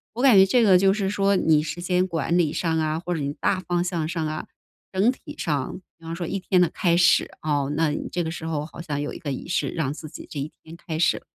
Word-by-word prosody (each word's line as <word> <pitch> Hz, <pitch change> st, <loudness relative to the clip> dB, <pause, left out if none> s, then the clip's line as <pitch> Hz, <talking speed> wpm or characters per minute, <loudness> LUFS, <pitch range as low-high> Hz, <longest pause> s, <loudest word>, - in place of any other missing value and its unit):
我 240 Hz, -, -3 dB
感 260 Hz, -4 st, +6 dB
觉 190 Hz, 0 st, +8 dB
这 240 Hz, +6 st, +3 dB
个 190 Hz, -4 st, +6 dB
就 195 Hz, +1 st, +4 dB
是 195 Hz, -2 st, -1 dB
说 200 Hz, 0 st, +2 dB
你 155 Hz, -4 st, +3 dB
时 175 Hz, +2 st, -5 dB
间 180 Hz, +1 st, +1 dB
管 170 Hz, -1 st, 0 dB
理 165 Hz, -4 st, +2 dB
上 165 Hz, 0 st, 0 dB
啊， 155 Hz, 0 st, 0 dB
或 175 Hz, +1 st, -3 dB
者 160 Hz, -, -3 dB
你 140 Hz, 0 st, -2 dB
大 185 Hz, -, +1 dB
方 175 Hz, -1 st, 0 dB
向 175 Hz, -3 st, -2 dB
上 165 Hz, -2 st, -2 dB
啊， 155 Hz, 0 st, -4 dB, 0.5 s
整 195 Hz, +6 st, +3 dB
体 255 Hz, -, -11 dB
上 145 Hz, 0 st, -2 dB, 0.2 s
比 165 Hz, -, -17 dB
方 165 Hz, +1 st, -4 dB
说 170 Hz, -1 st, -4 dB
一 195 Hz, -, -2 dB
天 185 Hz, 0 st, +2 dB
的 175 Hz, -, +4 dB
开 175 Hz, -4 st, +1 dB
始 175 Hz, 0 st, +4 dB
啊， 145 Hz, -2 st, 0 dB
那 160 Hz, 0 st, +2 dB
你 150 Hz, -, -3 dB
这 175 Hz, -, -1 dB
个 160 Hz, -, -3 dB
时 160 Hz, 0 st, -6 dB
候 155 Hz, -2 st, -2 dB
好 155 Hz, -, -11 dB
像 150 Hz, -4 st, -3 dB
有 145 Hz, -, -3 dB
一 -, -, -7 dB
个 145 Hz, -, -5 dB
仪 135 Hz, -, -5 dB
式 175 Hz, -, 0 dB
让 150 Hz, -5 st, -2 dB
自 155 Hz, +1 st, -7 dB
己 -, -, -10 dB
这 145 Hz, -, -5 dB
一 145 Hz, +3 st, -4 dB
天 160 Hz, +1 st, -11 dB
开 160 Hz, -2 st, -5 dB
始， 170 Hz, -, +2 dB
170 Hz, 295 characters per minute, -24 LUFS, 155-185 Hz, 0.5 s, 觉